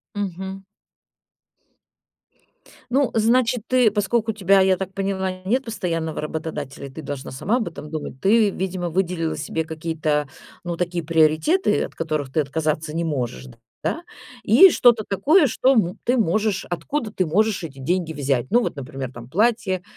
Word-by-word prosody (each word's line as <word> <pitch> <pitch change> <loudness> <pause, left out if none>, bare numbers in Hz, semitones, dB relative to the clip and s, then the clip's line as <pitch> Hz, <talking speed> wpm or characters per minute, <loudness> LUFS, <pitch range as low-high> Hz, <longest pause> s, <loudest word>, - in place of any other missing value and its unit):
Мгм. 190 -1 -4 2.3
Ну, 275 0 +2
значит, 235 +1 +2
ты 255 -3 +4
поскольку 220 +2 0
у - - -16
тебя, 195 -1 +4
я 190 0 +4
так 190 0 -5
поняла, 195 -1 -2
нет 250 +8 +1
постоянного 165 -8 -3
работодателя, 150 -3 -5
ты 155 +4 -9
должна 140 -2 -6
сама 205 - 0
об 225 - -2
этом 150 -2 -10
думать. 150 -4 -6
Ты, 210 +3 +4
видимо, 185 -2 -3
выделила 175 -2 -1
себе 160 +2 -3
какие-то, 155 -2 -2 0.4
ну, 175 -1 -3
такие 175 -1 -2
приоритеты, 160 - +2
от - - -9
которых 155 -5 -3
ты 155 - +2
отказаться 155 +1 -2
не 165 +2 -2
можешь, 125 - -3 0.4
да. 330 - -1 0.4
И 255 - +8
что-то 240 -7 +4
такое, 285 - +4
м, - - +5
что 260 +3 +2
мо 185 -5 +2
ты 250 - +1
можешь 215 -1 +1
откуда 215 - -3
ты 185 - 0
можешь 205 +5 +1
эти 145 -5 -8
деньги 165 +4 -1
взять. 135 -4 -1
Ну, 240 - +5
вот, - - -2
например, 135 -2 -6
там 120 -1 -10
платье, 205 - +1
180 Hz, 160 wpm, -22 LUFS, 155-215 Hz, 2.3 s, И